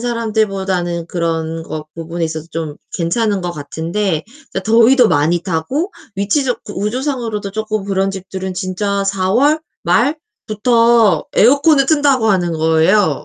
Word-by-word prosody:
사람들보다는 195 -7 -1
그런 165 -2 -2
것 155 -1 -6
부분에 165 +1 -4
있어서 160 -1 -5
좀 160 -3 -5 0.2
괜찮은 200 +4 0
것 175 - -2
같은데 165 +3 -3 0.3
그러니까 - - -2
더위도 235 +2 +5
많이 160 +4 +1
타고 200 - -2 0.2
위치적 245 +6 0
구조상으로도 220 0 -3
조금 215 0 -3
그런 195 0 0
집들은 190 -1 -6
진짜 195 +2 -2
4월 200 +11 +2 0.2
말부터 230 - +2
에어컨을 280 +4 +5
튼다고 280 -6 +3
하는 175 -3 +1
거예요, 160 +1 +2
195 Hz, 310 characters per minute, -17 LUFS, 170-230 Hz, 0.3 s, 더위도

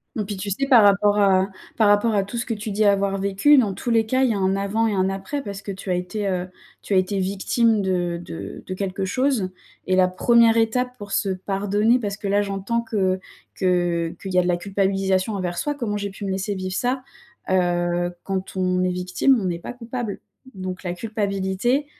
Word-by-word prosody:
Mmh, 215 - -1
puis 200 0 -5
tu 195 +2 -4
sais 275 +8 -1
par 245 -5 +7
rapport 205 +1 +4
à 190 -1 +4 0.3
par 220 - +4
rapport 205 +2 +4
à 200 - +2
tout 205 +5 -6
ce 230 - -2
que 230 - -2
tu 215 0 -5
dis 210 +2 +1
avoir 200 -1 +2
vécu 200 +9 +4
dans 215 -7 +3
tous 240 - -5
les 225 -1 +3
cas 260 +4 +1
il 260 - +3
y - - +1
a - - -2
un 190 0 +1
avant 200 +3 0
et 215 - 0
un 190 -1 +1
après, 195 +9 -4
parce 200 -2 -6
que 200 - -6
tu 195 0 -8
as - - +2
été 180 +4 -3
heu, 180 -1 -1 0.3
tu - - -3
as - - +5
été 185 +2 +1
victime 205 +4 +1
de 175 -3 -1
de 165 - -8
de 185 - -5
quelque 190 0 -3
chose. 250 -1 0 0.4
Et 185 - +1
la 185 0 +5
1re 230 +5 +4
étape 250 +3 +1
pour 205 -3 -9
se 195 - 0
pardonner, 205 +5 +1
parce 200 -4 -3
que 205 - -5
là 200 +1 +3
j'entends 200 +3 -2
que 195 -5 0 0.4
que 175 -2 0
qu'il 190 -1 -5
y 180 - +5
a - - +5
de - - -1
la 175 -1 +2
culpabilisation 195 +1 0
envers 180 -3 -3
soi: 295 +8 -1
«Comment 225 -7 -2
j'ai 200 0 -3
pu 195 +1 -8
me 195 - -2
laisser 195 +2 -2
vivre 185 0 -4
ça?» 255 +3 -1 0.5
Heu, 175 -1 +1
quand 190 0 -4
on 185 0 +1
est 185 - +1
victime 180 +8 +2
on 200 - -3
n'est 175 -2 -2
pas - - -7
coupable. 240 -3 -5 0.3
Donc 185 -1 -6
la 175 -1 -2
culpabilité, 205 +5 -1
195 Hz, 230 wpm, -23 LUFS, 185-220 Hz, 0.5 s, par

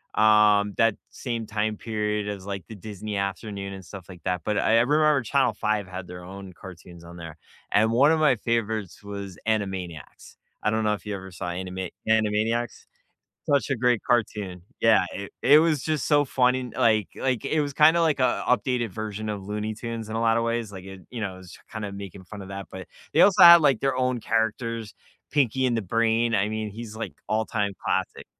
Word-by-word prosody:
um, 105 -1 +4
that 115 -2 +3 0.2
same 115 -3 -4
time 105 0 -2
period 105 -2 -2
as, 100 -2 -5
like, 100 -3 -5
the 110 - -9
Disney 105 +1 -6
Afternoon 100 0 -4
and 95 -1 -9
stuff 95 -2 -11
like 90 -4 -12
that, 90 -2 -1
but 105 +3 -1
I 110 - +2
I 115 - +6
remember 150 +2 +3
Channel 130 -1 +2
5 105 -1 -1
had 90 -1 -7
their 90 0 -9
own 95 0 -10
cartoons 85 -1 -12
on 85 +1 -11
there, 80 -1 -9 0.3
and 110 +2 +3
one 135 +6 +5
of 160 - +2
my 150 -4 +4
favorites 110 -4 -2
was 100 -2 -7
Animaniacs, 95 - -4 0.3
I - - +2
don't 110 0 0
know 105 0 +2
if 105 - -7
you 105 -1 -3
ever 95 -1 -9
saw 90 0 -5
Anima 95 +1 -5 0.2
Animaniacs. 110 +2 0 0.6
Such 140 -1 +1
a - - +2
great 120 -1 +2
cartoon, 105 -7 0 0.2
yeah, 115 -4 +5
it 100 0 -7
it 145 +4 +7
was 155 -4 +1
just 155 -3 -1
so 145 -1 +4
funny, 125 -2 +1
like 110 -5 +3
like, 130 -2 -1
it 155 +2 +1
was 145 -2 -3
kind 155 +3 +5
of, 170 - +3
like, 155 -4 +1
an 130 - +2
updated 125 0 +1
version 110 +1 -5
of 105 -2 -4
Looney 105 +1 -3
Tunes 115 0 -6
in 110 - -4
a 115 - -1
lot 115 0 +3
of 115 - 0
ways, 115 -2 -2
like, 95 -2 -9
it 95 -1 -10
you 120 - -6
know, 100 -3 -3
I - - -12
was 95 -1 -13
just - - -16
kinda 105 -3 -5
making 100 -1 -9
fun 100 +3 -10
of 95 - -9
that, 100 0 -7
but 95 -2 -8 0.3
they - - +5
also 195 -1 +6
had, 170 0 +10
like, 140 -6 +3
their 135 -2 0
own 125 -1 0
characters, 115 -1 -1 0.4
Pinky 130 -2 +2
and 120 - +1
the - - -1
Brain, 115 +3 +1
I 105 0 +2
mean, 110 0 -3
he's, 110 +1 -8
like, 115 - -5
all-time 110 -2 -1
classic. - - -2
110 Hz, 215 wpm, -25 LUFS, 100-120 Hz, 0.6 s, had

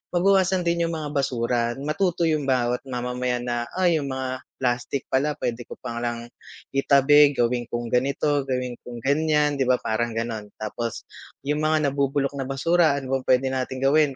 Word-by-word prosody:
mabawasan 190 0 +3
din 170 0 +1
yung - - -3
mga 150 -2 -5
basura 120 -4 0
matuto 165 +4 0
yung 155 -2 +1
bawat 125 -1 +1
mamamayan 125 -1 -2
na 120 -1 -1
"Ay, 180 -2 +3
yung 140 - -4
mga 130 0 -3 0.2
plastic 125 +1 -1
pala 145 +3 0
pwede 120 0 -2
ko - - -11
palang 120 0 -4 0.5
itabi 140 +1 +6
gawin 120 0 +1
kung 120 0 -3
ganito, 140 +3 +1
gawin 125 -1 -2
kung 120 -1 -8
ganiyan", 150 +1 +2
'di 135 - +2
ba, 125 - +5
parang 115 +2 -1
ganun. 115 -2 -3
Tapos 115 +2 -4 0.4
yung 150 +2 0
mga 155 -2 +2
nabubulok 140 0 0
na 135 - -2
basura 160 +3 +2
ano 135 -1 -1
bang 130 - -14
pwede 130 +1 +4
nating 130 0 -3
gawin 150 +1 +4
135 Hz, 170 wpm, -24 LUFS, 120-150 Hz, 0.5 s, itabi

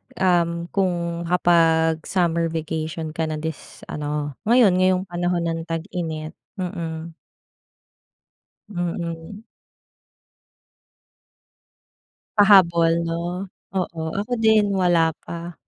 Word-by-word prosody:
um, 170 -2 +1
kung 170 -3 -1
nakapag-summer 165 0 +2
vacation 160 0 -4
ka 160 0 -2
na 155 - -3
this 160 0 -7
ano, 150 0 -3 0.2
ngayon, 235 -4 +6
ngayong 185 0 +3
panahon 175 0 0
ng 165 -1 -1
tag-init? 165 -2 -4 0.3
Mm. 170 -3 -4 1.6
Mm. 175 +2 -4 3.0
Pahabol, 170 -4 +5
‘no? 175 +3 -3 0.3
Oo, 175 -3 -2 0.2
ako 210 +5 -4
din 220 -1 +5
wala 175 -4 +3
pa. 170 0 -7
170 Hz, 85 wpm, -23 LUFS, 165-180 Hz, 3.0 s, ngayon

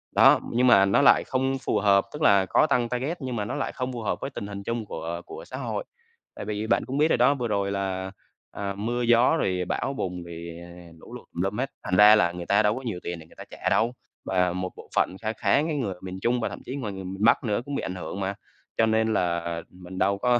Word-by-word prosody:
Đó, - - +7
nhưng 125 +2 +3
mà 100 -5 +7
nó 100 +8 +3
lại 140 - +6
không 135 +1 0
phù 105 - +1
hợp, 100 -1 +4
tức 150 - -7
là 100 -10 +5
có 155 - +3
tăng 120 -4 +1
target 135 +8 -2
nhưng 130 -2 -3
mà 105 -2 -2
nó - - -4
lại - - -2
không 130 -1 -3
phù 120 - -5
hợp 110 - -1
với 135 - -3
tình 100 - -6
hình 100 -1 -7
chung 115 +1 -3
của 85 -3 -5
của - - -9
xã - - -7
hội. - - -3 0.5
Tại - - -6
vì 105 +1 -3
bạn - - +2
cũng 130 +3 -4
biết 150 +2 +4
rồi - - +3
đó, 125 +4 +5
vừa 125 -3 -2
rồi 100 -2 0
là, 95 -1 -3 0.4
ờ, 100 -1 -4
mưa 120 +4 -2
gió 120 +6 +4
rồi 90 -7 0
bão 135 - -2
bùng, 90 -2 -3
rồi, 85 0 -8 0.4
lũ - - -13
lụt - - -11
tùm 85 - -3
lum 95 +4 -1
hết, 135 +2 -2
thành 90 - 0
ra 105 +2 +9
là 85 -5 +3
người 90 -1 -7
ta 100 +2 +3
đâu 105 +1 +2
có 130 - -5
nhiều 110 -8 -3
tiền 85 -1 -4
để 80 - -12
người - - -20
ta - - -9
trả - - -2
đâu. 115 +2 +2 0.3
Và 90 -1 +1
một 90 0 -3
bộ - - -13
phận 95 - +2
kha 110 0 -2
khá - - 0
cái 160 -1 -2
người 105 -9 -2
ở 90 - -18
miền 95 0 -6
Trung 120 +1 +1
và 115 - -1
thậm - - -8
chí 130 - -5
ngoài 110 -8 -4
người 95 - -7
miền 95 +3 -5
Bắc 115 - +5
nữa 105 -1 0
cũng 145 - -4
bị - - -1
ảnh 95 - -4
hưởng 95 +2 -6
mà, 95 +1 -2 0.4
cho 115 - +4
nên 110 0 +2
là 85 -2 -1
mình 90 0 -11
đâu 100 +1 +2
có 120 +3 +2
105 Hz, 275 wpm, -26 LUFS, 95-120 Hz, 0.5 s, ra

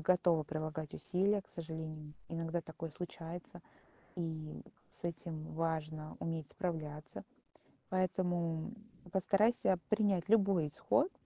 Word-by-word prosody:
готова 170 -1 +5
прилагать 155 0 -3
усилия. 195 +2 +2
К - - -27
сожалению, 160 -2 -5 0.2
иногда 165 0 -1
такое 165 0 -6
случается. 175 +1 -6 0.6
И 160 -2 -3 0.3
с - - -12
этим 160 -2 -3
важно 155 -1 -1
уметь 165 -3 -2
справляться. 155 -4 -3 0.7
Поэтому 175 -1 +1 0.4
постарайся 195 +1 +4
принять 205 -4 +3
любой 195 -8 +5
исход. 290 - +2
165 Hz, 100 wpm, -36 LUFS, 155-185 Hz, 0.7 s, готова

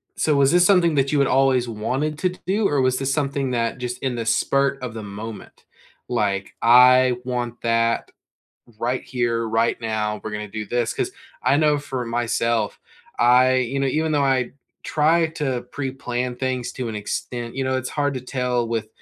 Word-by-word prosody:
So 150 -2 +1
was 140 0 +4
this 175 0 +5
something 180 -4 +4
that 135 0 +1
you 150 - +2
had 140 - +3
always 130 -2 +3
wanted 135 +8 -2
to 185 - +1
d 180 - -11
do, 200 +3 +1
or 145 -2 +1
was 130 0 +2
this 135 0 -1
something 140 -1 -1
that 120 0 -1
just 125 0 -4
in 130 -2 0
the 115 -1 -3
spur 140 +5 +1
of 120 -3 -4
the 110 - -6
moment, 105 +2 -9 0.4
like, 100 -5 -1
"I 125 +1 +6
want 120 -1 -3
that 115 0 +1 0.7
right 125 +2 -1
here, 115 -2 -1
right 115 +1 +1
now, 110 -2 -2
we're 110 - -5
gonna 105 0 -4
do 110 +1 -5
this," 120 +2 -1
'cause - - -2 0.3
I 140 - +3
know 150 -1 +3
for 135 -3 -4
myself, 115 -2 -1 0.4
I 125 +2 +5
you 130 +2 -1
know, 135 - +1
even 155 +4 0
though 145 -1 +2
I 130 -2 +1 0.3
try 160 +2 +2
to 140 -6 -3
pre-plan 125 -3 -3
things 125 -1 -2
to 125 -3 -4
an 110 - -5
extent, 115 +3 -4
you 135 - -1
know, 130 0 0
it's 130 0 -3
hard 145 -1 -1
to 130 - -3
tell 125 -2 -1
with 115 -2 -2
125 Hz, 190 wpm, -22 LUFS, 115-140 Hz, 0.7 s, I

